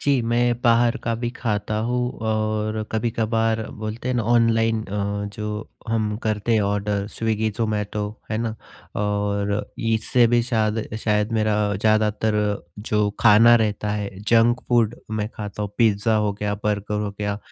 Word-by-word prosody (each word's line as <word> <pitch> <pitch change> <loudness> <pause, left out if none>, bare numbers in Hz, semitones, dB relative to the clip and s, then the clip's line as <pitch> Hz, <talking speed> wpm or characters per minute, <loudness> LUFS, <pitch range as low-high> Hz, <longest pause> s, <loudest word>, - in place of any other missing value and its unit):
जी, 140 -3 +2
मैं 120 +1 +1
बाहर 120 0 +4
का 115 0 0
भी 120 +1 -2
खाता 105 -4 -2
हूँ 125 0 0 0.2
और 110 0 -1
कभी-कभार 115 0 0
बोलते 110 +3 -5
हैं 130 - 0
ना 120 - +1
ऑनलाइन 115 -1 +3
अ, 100 0 -2
जो 105 0 -5 0.2
हम 110 -2 0
करते 110 +1 0
हैं 110 - +3
ऑर्डर 100 0 -1
स्विग्गी, 110 -1 -1
ज़ोमैटो, 105 -2 -1 0.3
है 110 - 0
ना? 115 -1 -2 0.5
और 100 0 -1
इससे 115 +2 +2
भी 120 0 +3
शायद 110 -2 -1
शायद 105 +1 +1
मेरा 110 -1 +1 0.2
ज़्यादातर 110 +1 +2 0.4
जो 105 -1 0
खाना 115 +2 +7
रहता 105 -2 -1
है, 105 -1 -2 0.2
जंक 120 +1 +4
फूड 120 -2 +3 0.2
मैं 105 -1 -2
खाता 105 0 -5
हूँ, 100 - -3
पिज़्ज़ा 110 0 +3
हो 105 -1 +1
गया, 105 0 -2
बर्गर 105 0 -1
हो 105 - -2
गया 105 0 -2
110 Hz, 155 wpm, -23 LUFS, 105-115 Hz, 0.5 s, खाना